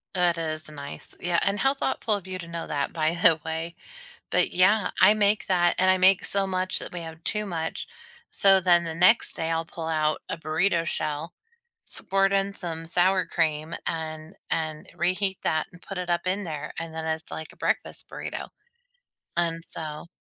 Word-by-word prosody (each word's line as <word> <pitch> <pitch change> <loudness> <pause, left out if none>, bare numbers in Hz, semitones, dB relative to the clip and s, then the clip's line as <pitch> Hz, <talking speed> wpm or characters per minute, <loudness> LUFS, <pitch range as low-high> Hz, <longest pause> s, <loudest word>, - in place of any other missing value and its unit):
That 175 -2 +3
is 155 -1 -3
nice. 145 -2 -9
Yeah, 175 -1 +2
and 200 +1 +1
how 270 +6 +3
thoughtful 265 -5 -1
of 195 -2 -7
you 185 0 -4
to 170 - -8
know 170 0 -5
that, 145 -2 -1
by 160 -1 +1
the 170 -3 +5
way. 160 +1 -3 0.5
But, - - +2
yeah, 200 +4 +4
I 210 - +8
make 210 0 +2
that, 175 -2 +3
and 185 0 +5
I 185 - +3
make 185 0 +5
so 200 -1 0
much 185 0 -1
that - - -6
we 175 - -3
have 160 0 -8
too 210 0 +1
much. 165 -4 -3 0.4
So 195 -1 +5
then 175 -1 +5
the 165 -1 -4
next 180 +7 +5
day, 160 0 -1
I'll 165 0 0
pull 165 0 -6
out 155 -1 +1
a - - -2
burrito 165 +2 +1
shell, 155 +1 -3 0.5
squirt 195 0 +1
in 195 0 +1
some 165 -4 -6
sour 180 +2 +2
cream, 155 -1 -1
and 160 0 -4 0.2
and 155 -1 -2
reheat 185 +3 0
that 155 -1 +1
and 180 - -15
put 195 - -7
it 180 -1 -4
up 175 +1 0
in 190 +3 0
there, 150 -4 -5
and 165 -1 -6
then 160 0 -4
it's 160 0 -3
like 160 - -6
a - - -19
breakfast - - -2
burrito. - - -5 0.9
And 165 -1 0
so 155 -1 -7
170 Hz, 195 wpm, -26 LUFS, 160-185 Hz, 0.9 s, I